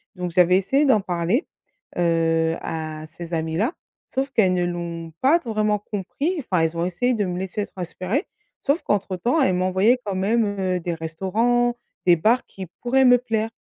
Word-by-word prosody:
Donc 180 -1 -4
j'avais 180 0 +4
essayé 270 +10 +2
d'en 225 -7 +4
parler, 180 - -1 0.5
heu, 165 -1 +2
à 155 -1 -5
ces 170 +2 -9
amis-là, 165 - 0 0.3
sauf 270 +1 -2
qu'elles 190 -7 +3
ne 180 - +1
l'ont 170 -1 -5
pas 300 +6 +5
vraiment 215 -5 0
compris, 215 - -3
enfin, 185 - 0
elles 165 +1 -1
ont 170 - 0
essayé 215 +8 0
de 210 -4 0
me 180 -1 -3
laisser 190 +2 -3
prospérer, 185 - -3 0.4
sauf 285 +5 +1
qu'entre-temps 205 - 0
elles 185 -9 +3
m'envoyaient 190 +7 +3
quand 200 -2 -2
même, 215 +4 +2
heu, 185 -1 0
des 175 0 -3
restaurants, 215 +10 0 0.3
des 175 -1 +6
bars 225 +9 +2
qui 190 -2 -9
pourraient 260 +2 +3
me 245 -1 +7
plaire. 225 -2 -2
190 Hz, 170 wpm, -23 LUFS, 175-240 Hz, 0.5 s, me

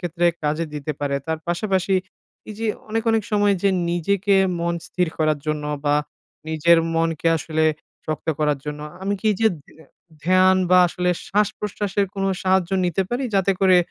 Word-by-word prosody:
ক্ষেত্রে 175 -1 0 0.2
কাজে 155 +3 0
দিতে 150 +1 -3
পারে। 140 -1 0
তার 160 0 -1
পাশাপাশি 190 +1 0 0.5
এই 210 - -6
যে 225 - -2 0.2
অনেক, 225 +1 -1
অনেক 225 -1 +2
সময় 205 -1 +3
যে 200 - +4 0.2
নিজেকে 195 +3 +1 0.2
মন 170 0 0
স্থির 180 -2 -1
করার 155 -1 +2
জন্য 150 -1 -2 0.2
বা 145 0 +3 0.5
নিজের 165 +2 +4 0.2
মনকে 165 0 +1
আসলে 160 0 -1 0.4
শক্ত 155 0 -4
করার 150 -2 +1
জন্য 150 0 -5 0.2
আমি 200 +1 0
কি 220 - -3
এই - - -4
যে - - +6 0.2
ধ্য - - -20 0.5
ধ্যান 185 +1 +5
বা 185 - +7
আসলে 180 +1 -1 0.2
শ্বাস-প্রশ্বাসের 205 -1 -1
কোনো 195 0 -1
সাহায্য 190 -1 +2
নিতে 175 +2 +1
পারি? 255 +2 -1
যাতে 195 0 +3
করে 185 -2 +5
180 Hz, 170 wpm, -22 LUFS, 160-195 Hz, 0.5 s, বা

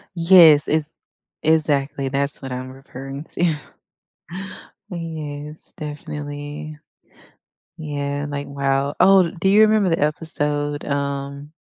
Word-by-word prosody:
Yes, 165 -4 +7
it's 155 0 0 0.5
exactly, 145 -3 +1
that's 140 +1 -2
what 135 -1 -6
I'm 130 +1 -5
referring 135 +1 -8
to. 170 -3 +1 1.3
Yes, 155 -3 -6 0.2
definitely, 150 0 -6 1.0
yeah, 145 -2 -3
like, 140 0 -4
wow 140 0 0
oh, 185 -2 +6
do 190 +3 0
you 210 +2 +6
remember 215 -3 +4
the 165 - +1
episode, 145 -1 -1
um 140 0 -3
145 Hz, 105 wpm, -21 LUFS, 140-160 Hz, 1.3 s, Yes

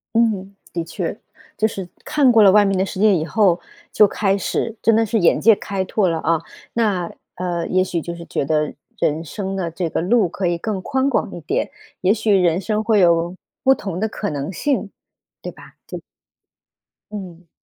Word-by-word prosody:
嗯， 205 -4 +1 0.2
的 170 -1 -2
确。 170 +4 -4 0.4
就 220 - +2
是 195 -4 -6 0.2
看 290 -4 +3
过 225 -2 +6
了 195 -2 +7
外 210 0 +6
面 195 -1 +1
的 190 - +2
世 190 - -6
界 210 -1 +5
以 160 -3 0
后， 185 -1 +2 0.3
就 210 - +6
开 195 0 0
始 225 +3 -2
真 225 - +4
的 225 +1 +3
是 225 +1 0
眼 175 -4 +3
界 225 +1 +6
开 195 -1 -3
拓 190 0 +1
了 165 -1 0
啊。 160 0 +1 0.3
那， 200 -7 0 0.2
呃， 175 -2 -3
也 185 0 +2
许 180 -2 -2
就 170 +2 -6
是 170 0 -9
觉 - - -2
得 150 +1 0 0.3
人 155 +2 0
生 195 +3 -5
的 175 -3 -2
这 170 +1 -3
个 - - -1
路 200 +3 +2
可 185 +2 -3
以 175 0 +1
更 205 +1 -3
宽 265 +5 0
广 220 - -1
一 - - -7
点， 150 - -2 0.3
也 190 +3 +3
许 220 -1 0
人 180 -2 +3
生 215 +2 -1
会 220 -2 +3
有 170 0 +3 0.3
不 265 - +6
同 195 -8 -5
的 220 - 0
可 210 -1 -4
能 145 +3 -4
性， 240 -1 -1 0.5
对 - - -5
吧？ - - -16
就 - - -6 1.1
嗯。 180 -4 -8
190 Hz, 220 characters per minute, -20 LUFS, 170-215 Hz, 1.1 s, 了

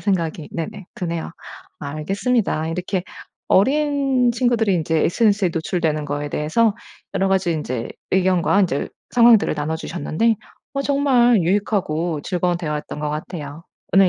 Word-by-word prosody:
생각이 170 -6 -1
네네 175 +3 -5
드네요. 170 -2 -3 0.5
알겠습니다. 160 - -1
이렇게 180 +2 -2 0.5
어린 270 +1 +3
친구들이 230 -4 +2
인제 160 -1 0
SNS에 205 -1 +2
노출되는 160 -2 -1
거에 145 0 -3
대해서 200 +9 +1 0.4
여러 195 0 +1
가지 190 -3 +2
인제 130 -7 -3 0.2
의견과 185 +1 +3
인제 155 -7 0 0.2
상황들을 235 -3 +5
나눠 155 +2 -2
주셨는데 180 +7 0 0.4
어 275 - 0
정말 260 -5 +4
유익하고 175 -4 0
즐거운 180 -1 0
대화였던 150 -3 -4
것 150 - -1
같아요. 155 -1 -6 0.3
오늘 195 -1 +6
180 Hz, 330 characters per minute, -21 LUFS, 160-220 Hz, 0.5 s, 오늘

